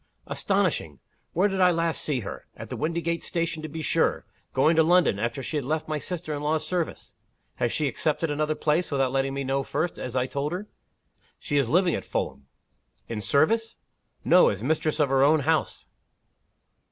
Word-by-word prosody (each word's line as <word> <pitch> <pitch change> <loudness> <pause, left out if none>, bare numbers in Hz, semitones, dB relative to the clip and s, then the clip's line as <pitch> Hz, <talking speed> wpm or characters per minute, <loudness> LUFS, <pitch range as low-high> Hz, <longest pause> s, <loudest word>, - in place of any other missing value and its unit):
"Astonishing! - - 0 0.3
Where 185 +5 +3
did 190 -1 -1
I 180 - +7
last 165 -1 +1
see 140 -5 0
her? 100 - -8
At - - -8
the - - -4
Windygates 170 +1 -2
station, 170 -2 -2
to 155 - -6
be 160 +1 -5
sure - - +1 0.3
going 155 +5 +3
to - - +7
London, 170 - +4
after 115 +4 -2
she 155 - -2
had 145 - -1
left 155 +4 -2
my 155 -1 -2
sister 170 -1 -4
in 145 - -4
law's 155 +1 0
service. 175 -3 -3 0.4
Has 120 -2 0
she 150 - 0
accepted 150 +5 -1
another 155 +1 0
place 155 +4 +1
without 135 -3 +1
letting 135 0 0
me 140 - -2
know 135 +1 0
first, 155 +5 -2
as 125 - -5
I 125 -1 +2
told 140 +4 -3
her?" 195 +4 -5 0.7
"She 145 - -2
is 135 -5 +2
living 175 +2 +3
at - - -2
Fulham." 70 0 -4 0.6
"In 110 -2 -4
service?" 220 - +2 0.5
"No. 180 - +6
As 100 +1 -4
mistress 155 +2 0
of 145 -3 +3
her 135 0 +3
own 150 +2 +5
house." 160 +3 0
155 Hz, 190 wpm, -26 LUFS, 135-165 Hz, 0.7 s, I